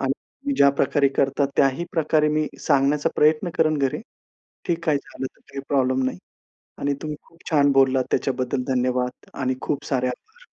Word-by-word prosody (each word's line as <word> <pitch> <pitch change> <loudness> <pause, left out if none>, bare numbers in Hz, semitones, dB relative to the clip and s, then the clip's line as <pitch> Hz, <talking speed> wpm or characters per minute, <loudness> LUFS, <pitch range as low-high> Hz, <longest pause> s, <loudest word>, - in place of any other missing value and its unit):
आणि 275 - -3
ज्या 140 - +6
प्रकारे 140 +1 +3
करता, 140 +1 +2
त्याही 135 +5 +2
प्रकारे 155 -1 +2
मी 155 0 +1 0.2
सांगण्याचा 145 0 +3
प्रयत्न 155 +3 +3
करेन 155 -1 +3
घरी, 135 -2 0 0.7
की 170 - +1
काय 155 -3 +3
झालं, 135 -1 -6
तर - - -14
काही 140 - -5
प्रॉब्लेम 130 -1 +2
नाही. 130 - -2 0.6
आणि 140 0 0
तुम्ही 150 -1 -4
खूप 165 - -24
छान 145 -3 +4
बोललात, 135 -1 +3
त्याच्याबद्दल 130 0 -1
धन्यवाद 125 0 -1
आणि 130 -1 -1
खूप 145 - -2
सारे 130 -2 0
आभार. 445 - -10
140 Hz, 165 wpm, -23 LUFS, 130-155 Hz, 0.7 s, ज्या